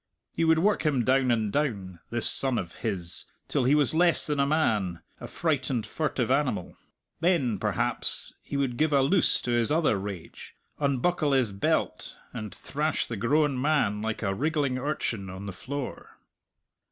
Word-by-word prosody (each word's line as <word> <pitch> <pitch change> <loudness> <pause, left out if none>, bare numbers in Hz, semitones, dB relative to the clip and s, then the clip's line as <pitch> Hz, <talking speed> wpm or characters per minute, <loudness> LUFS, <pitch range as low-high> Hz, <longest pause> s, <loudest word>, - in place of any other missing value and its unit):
He 165 - -1
would 160 0 +4
work 200 +6 +2
him 140 -7 +1
down 130 0 +3
and 110 -4 0
down, 100 - -2
this 120 0 0
son 130 -3 +5
of 85 -5 -4
his, 95 -7 -3 0.2
till 140 -4 0
he 135 +4 +4
was 150 -1 +2
less 170 +1 +4
than 150 -2 -1
a 140 - +3
man, 105 - 0 0.2
a - - -7
frightened, 130 -8 -1
furtive - - -2
animal. - - 0 0.4
Then, 155 - +1
perhaps, - - +1
he 140 - -5
would 130 -4 -1
give 155 -1 +1
a 140 -1 +4
loose 175 +7 +3
to 120 - -2
his 120 +2 +1
other 155 -10 +2
rage, 95 -4 -8 0.2
unbuckle 145 +2 +1
his 130 -6 +2
belt, 100 0 -1 0.2
and 110 -4 -6
thrash 150 +2 -2
the 115 - -5
grown 135 +4 +1
man 135 -8 +1
like 110 +1 -3
a 95 -2 0
wriggling 140 - -1
urchin 115 -8 -3
on 95 +2 -8
the 100 - -6
floor. 135 +8 -7
130 Hz, 170 wpm, -27 LUFS, 110-150 Hz, 0.4 s, son